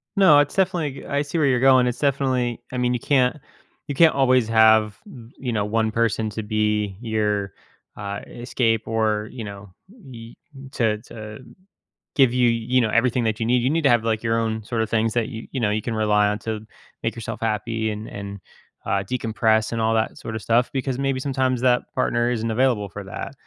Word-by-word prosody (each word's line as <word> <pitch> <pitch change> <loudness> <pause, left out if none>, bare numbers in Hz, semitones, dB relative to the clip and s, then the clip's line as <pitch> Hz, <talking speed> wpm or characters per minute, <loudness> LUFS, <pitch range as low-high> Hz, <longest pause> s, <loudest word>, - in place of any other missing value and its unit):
No, 185 -8 +6
it's 145 -1 0
definitely 175 -7 0
go - - -11
I 140 0 +1
see 145 +3 -4
where 155 -3 +3
you're 125 -2 +2
going. 130 -1 +5
It's 125 - -3
definitely 130 -4 0
I 130 - -4
mean, 125 0 +1
you 125 - -1
can't 130 +2 +2 0.5
you 145 - -4
can't 165 +2 +5
always 130 -3 +3
have 110 -2 +4
m 120 - -13
you 125 -2 -4
know, 105 -2 0
one 110 +1 0
person 110 -1 0
to 110 +1 -5
be 105 -2 -1
your, 105 -4 -1 0.4
uh, 100 0 -5
escape 115 -2 -1
or, 110 -1 0
you 120 -3 -7
know, 100 -1 -9 0.2
y 130 - -12 0.2
m 135 0 -11
to 110 -3 +1
to 110 -2 -9 0.8
give 130 -4 +4
you, 125 -1 +3
you 115 +2 +1
know, 115 - +1
everything 120 +2 +2
that 110 -1 -1
you 115 - -1
need. 120 +1 +2
You 130 - +1
need 165 +1 0
to 140 - +5
have, 120 -2 +3
like, 110 -1 -1
your 115 0 +1
own 110 -1 -2
sort 115 +2 -2
of 110 - -2
things 115 0 +1
that 115 -2 0
you 115 -3 -8
you 130 - -3
know, 105 -3 +1
you 105 +1 -1
can 115 +1 -4
rely 105 -1 +3
on 105 +1 -1
to 110 -1 -4 0.4
make 115 - -1
yourself 115 -2 -6
happy 110 0 -1
and 105 +1 -6
and, 100 0 -7 0.5
uh, 100 0 0
decompress 110 -1 0
and 115 - -1
all 110 0 +2
that 110 0 -1
sort 110 - -6
of 110 - -4
stuff 115 +4 +1
because 130 -1 -2
maybe 135 -1 -1
sometimes 130 -2 -1
that 125 -1 +3
partner 120 0 +1
isn't 115 -1 -2
available 115 -3 +1
for 105 +2 -8
that. 95 +7 -7
115 Hz, 215 wpm, -23 LUFS, 110-130 Hz, 0.8 s, No